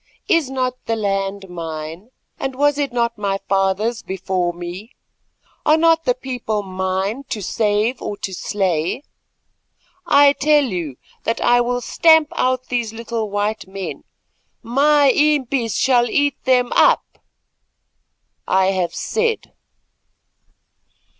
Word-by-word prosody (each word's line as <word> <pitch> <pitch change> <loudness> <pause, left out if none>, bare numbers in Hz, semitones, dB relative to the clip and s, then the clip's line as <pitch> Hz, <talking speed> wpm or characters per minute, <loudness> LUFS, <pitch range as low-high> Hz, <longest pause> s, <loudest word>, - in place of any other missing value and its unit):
Is 325 -6 +2
not 255 -1 -2
the 225 - +1
land 195 -2 -2
mine, 165 +2 -7 0.3
and 270 -1 -3
was 290 +1 +2
it 280 -3 -1
not 235 -2 -1
my 200 -1 0
father's 195 +4 0
before 185 -2 -2
me? 175 +6 -8 0.7
Are 305 +1 +4
not 330 0 +3
the 250 - +2
people 245 -5 -3
mine 190 +5 -2
to 215 - -3
save 215 +5 0
or 205 - -4
to 190 - -5
slay? 185 - -1 1.0
I 285 0 +6
tell 295 +1 +3
you 175 - -3 0.3
that 230 - -1
I 245 0 +4
will 245 +1 -1
stamp 320 +2 +4
out 255 0 0
these 240 -3 -1
little 230 -1 -4
white 205 0 -2
men; 195 0 -6 0.6
my 285 +3 +4
impis 275 -5 +1
shall 245 -2 +3
eat 285 +3 0
them 250 -1 +3
up. - - +3 1.3
I 190 0 +3
have 180 -3 -2
said!" 455 0 -2
230 Hz, 125 wpm, -20 LUFS, 195-265 Hz, 1.3 s, I